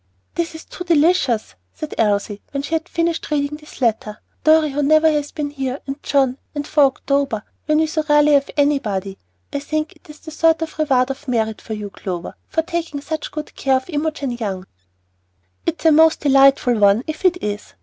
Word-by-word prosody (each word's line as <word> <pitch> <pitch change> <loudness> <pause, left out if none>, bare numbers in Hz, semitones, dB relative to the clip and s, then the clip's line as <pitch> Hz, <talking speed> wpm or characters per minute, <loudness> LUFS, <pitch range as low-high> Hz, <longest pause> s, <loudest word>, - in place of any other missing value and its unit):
"This 340 -1 -2
is 320 - -10
too 360 - -8
delicious!" 310 -8 +2 0.2
said 310 - -6
Elsie, 205 -1 0
when 275 0 -3
she 300 - -5
had 325 +2 -1
finished 335 -1 -1
reading 295 0 -1
this 300 -2 -15
letter. 215 -3 0 0.3
"Dorry, 310 -1 +4
who 290 +2 -1
never 310 +2 +4
has 295 -2 0
been 290 -2 -4
here, 270 -1 -3
and 275 +1 -6
John, 270 -2 +1 0.2
and 290 0 -3
for 295 -1 +4
October, 275 -4 0 0.2
when 305 0 +3
we 315 - +3
so 310 0 -1
rarely 295 0 +5
have 280 -1 +3
anybody! 210 -10 0 0.3
I 285 - -1
think 310 +2 -3
it - - -24
is 300 +2 -14
a - - -5
sort 325 +1 +2
of 320 0 -8
'reward 265 -4 +2
of 275 +2 -9
merit' 220 -3 -1
for 220 - -6
you, 205 -1 -6
Clover, 180 -4 -5
for 320 - 0
taking 330 -3 -3
such 310 +1 -4
good 305 0 -7
care 270 -1 +1
of 260 +7 -7
Imogen 295 -3 -2
Young." 200 -6 -4 1.0
"It's 335 0 -2
a 320 - +7
most 320 +1 +5
delightful 275 -4 +4
one 205 +3 +4
if 310 +3 -6
it 360 -1 +3
is. 205 0 -4
285 Hz, 200 wpm, -20 LUFS, 250-310 Hz, 1.0 s, a